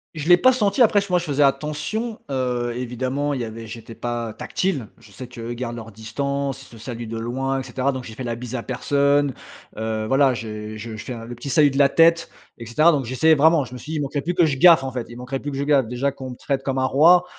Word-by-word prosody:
Je 155 Hz, +1 st, -4 dB
l'ai 175 Hz, -, +9 dB
pas 255 Hz, +8 st, +5 dB
senti. 210 Hz, -1 st, +1 dB
Après, 210 Hz, -3 st, +5 dB
ch 200 Hz, -, -7 dB
moi, 180 Hz, -1 st, +3 dB
je 175 Hz, -, -6 dB
faisais 145 Hz, -2 st, +2 dB
attention, 150 Hz, -, -1 dB
heu, 125 Hz, -2 st, -1 dB
évidemment, 130 Hz, +4 st, -2 dB
il 130 Hz, -, -3 dB
y -, -, -1 dB
avait 115 Hz, 0 st, -7 dB
j'étais 115 Hz, +1 st, -9 dB
pas 120 Hz, -2 st, -3 dB
tactile. 150 Hz, -, -2 dB
Je 115 Hz, -3 st, -18 dB
sais 125 Hz, +6 st, -9 dB
que 120 Hz, -1 st, -10 dB
eux 115 Hz, +1 st, -4 dB
gardent 120 Hz, -1 st, -5 dB
leurs 115 Hz, -1 st, -8 dB
distances. 140 Hz, +5 st, -3 dB
Ils -, -, -16 dB
se 115 Hz, -, -14 dB
saluent 120 Hz, 0 st, -6 dB
de 115 Hz, -, -4 dB
loin 135 Hz, +4 st, -2 dB
et -, -, -4 dB
cetera. 130 Hz, +2 st, -1 dB
Donc, 130 Hz, -2 st, -6 dB
j'ai 110 Hz, -, -9 dB
fait 130 Hz, -, -7 dB
la 120 Hz, -1 st, -3 dB
bise 125 Hz, +1 st, -7 dB
à 120 Hz, -, -3 dB
personne, 140 Hz, +2 st, +1 dB, 0.4 s
heu, 110 Hz, 0 st, -2 dB
voilà 135 Hz, +1 st, +4 dB
j'ai 110 Hz, -2 st, -6 dB
je 110 Hz, +1 st, -7 dB
fais 110 Hz, +4 st, -6 dB
le 120 Hz, +1 st, -8 dB
petit 120 Hz, +4 st, -7 dB
salut 145 Hz, +2 st, +5 dB
de 135 Hz, -, -4 dB
la 140 Hz, -1 st, +5 dB
tête, 165 Hz, +2 st, +4 dB, 0.3 s
et 115 Hz, -, -9 dB
cetera. 155 Hz, +9 st, +4 dB
Donc, 140 Hz, -2 st, 0 dB
j'essayais 130 Hz, +7 st, +3 dB
vraiment. 155 Hz, 0 st, +4 dB
Je 120 Hz, -, -12 dB
me -, -, -6 dB
suis 150 Hz, -, -9 dB
dis: 160 Hz, -, -2 dB
«Il -, -, -1 dB
manquerait 140 Hz, +1 st, -2 dB
plus 175 Hz, +5 st, -2 dB
que 175 Hz, -, +5 dB
je 150 Hz, -3 st, 0 dB
gaffe, 165 Hz, -1 st, +7 dB
en 135 Hz, -, -3 dB
fait, 125 Hz, -3 st, -3 dB
il 120 Hz, -, -10 dB
manquerait 130 Hz, +2 st, -4 dB
plus 145 Hz, -, -5 dB
que 135 Hz, -, -5 dB
je 140 Hz, -, -1 dB
gaffe.». 140 Hz, -3 st, +3 dB
Déjà 130 Hz, +4 st, -1 dB
qu'on 130 Hz, -2 st, -8 dB
me 125 Hz, -, -7 dB
traite 135 Hz, -1 st, -2 dB
comme 135 Hz, -1 st, -2 dB
un 130 Hz, -, +2 dB
roi, 170 Hz, +7 st, +5 dB
135 Hz, 275 wpm, -22 LUFS, 120-145 Hz, 0.4 s, l'ai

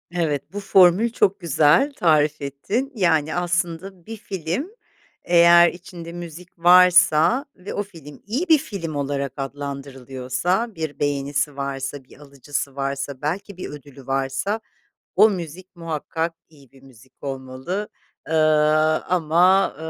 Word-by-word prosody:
Evet, 155 Hz, -1 st, -2 dB
bu 205 Hz, -, -4 dB
formül 195 Hz, +3 st, +4 dB
çok 200 Hz, -3 st, +1 dB
güzel, 165 Hz, -, +3 dB
tarif 155 Hz, -, +2 dB
ettin. 200 Hz, -, -3 dB
Yani, 160 Hz, -6 st, +1 dB
aslında 175 Hz, +1 st, -2 dB
bir 225 Hz, 0 st, -8 dB
film, 190 Hz, -, -4 dB, 0.5 s
eğer 170 Hz, 0 st, +6 dB
içinde 175 Hz, -1 st, -10 dB
müzik 175 Hz, 0 st, -10 dB
varsa 180 Hz, -, +5 dB
ve 185 Hz, +2 st, -8 dB
o 205 Hz, -, -2 dB
film 165 Hz, -8 st, -14 dB
iyi 265 Hz, -, -2 dB
bir 315 Hz, -, +7 dB
film 165 Hz, -, -6 dB
olarak 140 Hz, -2 st, -2 dB
adlandırılıyorsa, 140 Hz, -, -3 dB
bir 160 Hz, -2 st, -5 dB
beğenisi 145 Hz, 0 st, -1 dB
varsa, 140 Hz, 0 st, -4 dB
bir 130 Hz, -, -19 dB
alıcısı 140 Hz, -1 st, -6 dB
varsa, 140 Hz, 0 st, -4 dB
belki 185 Hz, +5 st, -4 dB
bir -, -, -6 dB
ödülü 140 Hz, -2 st, -12 dB
varsa, 135 Hz, +11 st, -1 dB, 0.6 s
o 220 Hz, -, +7 dB
müzik 180 Hz, 0 st, -7 dB
muhakkak 165 Hz, 0 st, -3 dB, 0.2 s
iyi 140 Hz, -5 st, -21 dB
bir 135 Hz, -1 st, -20 dB
müzik 130 Hz, -1 st, -19 dB
olmalı. 135 Hz, +9 st, -5 dB, 0.4 s
Eee, 160 Hz, -, -4 dB, 0.7 s
ama, 180 Hz, +3 st, +3 dB
165 Hz, 125 wpm, -22 LUFS, 140-185 Hz, 0.7 s, bir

